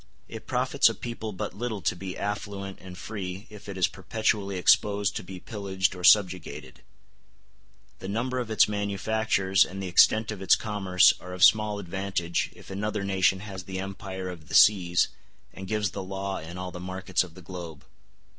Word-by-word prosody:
It - - -9
profits - - +3
a - - -4
people 115 -2 -5
but 95 - -5
little 115 -1 -4
to 75 - +1
be 95 +1 -6
affluent 100 -1 -4
and 90 -1 -10
free 95 -1 -6
if 105 -1 -11
it 100 - -6
is 90 - +3
perpetually 100 -1 -1
exposed 100 +2 +3
to - - -4
be 90 0 -9
pillaged 95 -2 -2
or 90 -1 -9
subjugated; 90 -2 +2 1.2
the - - -7
number 125 +5 -1
of 120 -3 -4
its 110 -2 +4
manufactures 100 -1 +1
and 95 +2 -7
the 95 - -4
extent 110 +5 +4
of 105 -3 -7
its 95 - +5
commerce 95 -4 +3
are 90 - -9
of 90 - 0
small 105 -1 +5
advantage 95 -2 -2
if - - -13
another 105 +1 -2
nation 95 -1 +2
has 95 -3 -8
the 95 -1 -5
empire 95 -1 -6
of 80 -5 -10
the - - -4
seas 90 -4 +5 0.4
and 95 0 -8
gives 105 -1 -1
the 100 - -5
law 95 +1 -4
in 85 +3 -9
all 90 0 -5
the 90 - -8
markets 95 +1 -1
of 85 -3 -12
the 95 - -12
globe. 85 -4 -8
95 Hz, 185 wpm, -27 LUFS, 90-105 Hz, 1.2 s, its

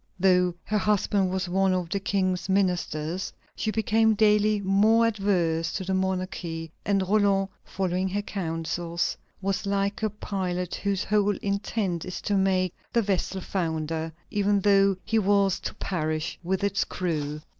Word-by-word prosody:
Though 180 -1 +3
her 210 0 0
husband 200 -1 +2
was 185 0 -2
one 190 +1 +2
of 180 -2 -2
the 200 - 0
King's 185 -2 -1
ministers, 180 -3 0 0.2
she 220 - -2
became 220 0 +3
daily 210 0 +4
more 205 +4 +4
adverse 185 -7 +1
to 190 - -2
the 190 +1 -2
monarchy, 185 -3 -2
and 200 -1 +1
Roland, 200 -1 +3
following 185 0 -1
her 205 +2 -2
counsels, 170 -2 -2 0.3
was 195 +1 -1
like 200 +1 0
a 215 - +1
pilot 185 -4 -3
whose 200 -2 -1
whole 205 -1 +2
intent 200 -3 -1
is 185 - -5
to 205 - -1
make 185 -2 +2 0.2
the 235 - +2
vessel 190 -1 -1
founder, 160 -3 -2 0.2
even 205 0 +2
though 195 -1 +4
he 225 0 +2
were 200 -1 +3
to - - -4
perish 155 -4 -2
with 190 +2 -1
its 200 +1 +1
crew. 150 -4 -3
190 Hz, 150 wpm, -26 LUFS, 180-205 Hz, 0.3 s, daily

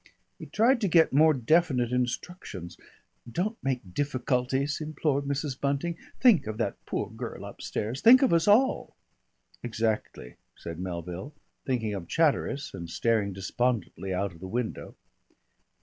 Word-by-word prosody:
He - - -8
tried 240 +3 +3
to 205 - +2
get 165 -4 +4
more 155 +3 +6
definite 130 -2 +2
instructions. 125 - -3 0.6
"Don't 210 - -2
make 125 -9 -3
difficulties," 135 - -1
implored 150 -2 -1
Mrs. 140 -1 -3
Bunting. 140 +5 0 0.2
"Think 205 - +5
of 110 0 -4
that 110 -4 -3
poor - - -2
girl - - -7
upstairs. 115 +6 -4
Think 255 +4 +8
of 260 - +3
us 165 +2 +3
all." 235 +6 +3 0.7
"Exactly," 110 - -3 0.2
said 85 0 -8
Melville, 90 - -6 0.3
thinking 115 -5 0
of 95 -4 -5
Chatteris 145 - 0
and 85 -1 -7
staring 110 0 +1
despondently 95 0 -2
out 95 +1 -1
of 85 - -15
the 95 - -7
window. 120 +3 -4
130 Hz, 135 wpm, -28 LUFS, 105-155 Hz, 0.7 s, Think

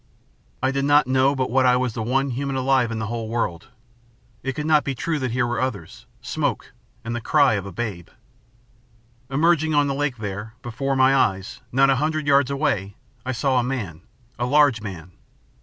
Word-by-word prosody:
I 130 - +2
did 140 0 -1
not 145 0 +5
know 130 +2 +2
but 130 -2 -1
what 130 +1 +3
I 125 - +5
was 125 -2 0
the 115 - -4
one 135 +4 0
human 135 +2 -3
alive 130 -2 +2
in 115 - -4
the 110 - -3
whole 115 0 -4
world. 100 -8 -2 0.7
It 135 - -3
could 150 +2 -4
not 155 -1 +4
be 135 - -3
true 160 +4 -2
that 130 -2 -2
here 120 +2 0
were 120 +1 -2
others 105 -11 -5 0.2
smoke, - - -2 0.3
and 115 +1 -4
the 120 - -3
cry 140 0 +3
of 100 -2 -2
a - - -7
babe. 90 -3 -5 1.2
"Emerging 155 +2 +2
on 145 0 +4
the 140 - -1
lake, 140 -2 -1
there, 105 +1 -6
before 135 +3 -2
my 130 +1 +4
eyes, 95 -7 0
not 135 +2 +4
a 135 - +2
hundred 155 +2 -1
yards 140 -2 +4
away, 110 -9 -1 0.3
I - - 0
saw 130 0 +1
a - - +1
man, 110 - -4 0.4
a 120 - 0
large 145 -4 +4
man. 90 -4 -8
130 Hz, 200 wpm, -23 LUFS, 115-140 Hz, 1.2 s, not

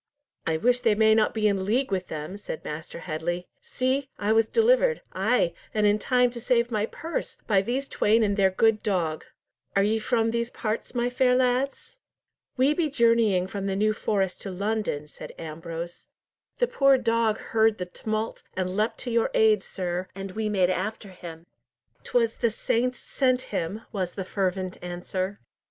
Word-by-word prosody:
"I 160 -1 +2
wish 245 +7 +2
they 230 -4 +3
may 220 0 +5
not 220 -1 +3
be 215 -1 +1
in 195 -2 +1
league 235 +5 0
with 185 -1 -1
them," 155 +4 -5
said 205 -5 -7
Master 160 +2 -6
Headley. 175 +2 -3
"See! 260 +2 -1
I 205 +1 0
was 225 0 +4
delivered—ay, 450 - +2 0.2
and 215 -1 +3
in 205 +1 +4
time 250 +1 +3
to 235 -1 -8
save 240 0 +2
my 215 -1 0
purse, 325 +7 -5
by 200 -3 +3
these 255 +6 -2
twain 225 -1 +3
and 200 -1 +1
their 195 -2 +4
good 215 +3 +2
dog. 170 -7 -1 0.5
Are 195 - +4
ye 220 +2 +2
from 225 0 +1
these 235 0 -1
parts, 220 +2 -4
my 245 0 0
fair 250 0 +3
lads?" 260 - 0 0.6
"We 265 +4 +4
be 315 -1 0
journeying 230 -8 +3
from 195 +1 -4
the 195 - -1
New 215 +2 +2
Forest 195 -3 -1
to 195 - -5
London," 200 -6 -2
said - - -10
Ambrose. 165 +2 -7 0.5
"The - - +3
poor 275 - +4
dog 230 -3 +1 0.2
heard 220 -1 +4
the 180 - -3
tumult, 215 +4 -3 0.2
and 185 0 -1
leapt 215 +2 0
to 245 - -4
your 230 0 +2
aid, 215 -2 +5
sir, 180 -1 -4
and 195 0 -6
we 215 +2 -2
made 185 -3 +2
after 205 +2 -3
him." 170 -3 -10 0.6
"'Twas 230 -2 +1
the 235 - +2
saints 240 +3 0
sent 255 -2 +1
him!" 195 +4 -2
was 185 -4 -2
the 190 - -5
fervent 185 -1 -2
answer. 185 +2 -4
215 Hz, 175 wpm, -26 LUFS, 185-240 Hz, 0.6 s, may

